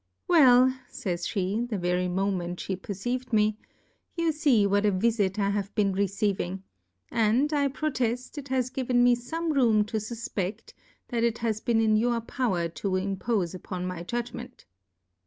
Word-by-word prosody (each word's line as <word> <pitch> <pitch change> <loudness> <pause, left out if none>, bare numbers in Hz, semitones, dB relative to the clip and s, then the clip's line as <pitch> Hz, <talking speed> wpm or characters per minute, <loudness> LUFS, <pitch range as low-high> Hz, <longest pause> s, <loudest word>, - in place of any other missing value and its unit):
Well! 260 -6 +6 0.2
jajs 175 -3 -3
pe, 200 +4 -1
the 220 -4 -2
very 180 0 0
Moment 180 -1 -1
flie 195 - -3
perceived. 240 +7 -4
me, 215 -1 +2 0.6
you 335 -1 +1
fee 285 -9 +3
what 200 +1 +2
a 210 - +3
Vifit 200 0 +1
I 200 -1 +1
have 200 0 -3
been 200 -3 +2
receiving; 195 -1 -1 0.5
a.nd, 235 +6 +2
I 285 -1 +2
proteft, 255 -4 -2
it 280 - -9
has 255 -2 0
given 250 -2 +1
me 245 0 +5
fome 320 +7 -3
room 225 -6 +4
to 220 +1 -3
fufpetl 215 -2 -4 0.4
that 235 -1 -1
it 235 -1 +1
has 225 -2 -2
been 230 -2 +1
in 215 -1 +3
your 235 +1 +1
Pov/er 220 -8 -1
to 170 - -5
impofe 190 0 -1
upon 180 0 -5
my 180 -2 -4
Judgment. 240 - -6
220 Hz, 160 wpm, -27 LUFS, 195-245 Hz, 0.6 s, Well